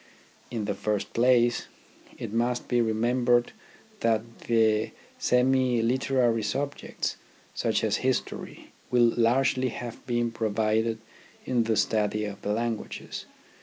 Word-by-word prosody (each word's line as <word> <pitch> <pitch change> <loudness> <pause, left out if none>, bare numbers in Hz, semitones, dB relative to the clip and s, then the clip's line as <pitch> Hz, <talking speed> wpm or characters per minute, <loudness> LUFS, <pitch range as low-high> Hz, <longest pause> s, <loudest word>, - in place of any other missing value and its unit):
In 115 -4 -3
the 105 - -1
first 105 -2 -2
place, 120 0 +3 0.5
it 100 - -6
must 120 +1 0
be 120 -1 +2
remembered 120 +2 +2 0.5
that 115 0 0
the 110 -2 +3 0.3
semi 125 -1 +3
literary 125 -1 +2
subjects, 135 +7 -3 0.4
such - - 0
as - - +2
history, - - -3 0.2
will 120 -2 +4
largely 130 +2 +2
have 120 0 -7
been 120 -1 0
provided 110 0 0 0.5
in 120 -3 +1
the 110 -1 +1
study 105 0 +1
of 100 -1 -7
the 105 - -2
languages. 115 0 -3
115 Hz, 120 wpm, -27 LUFS, 110-125 Hz, 0.5 s, will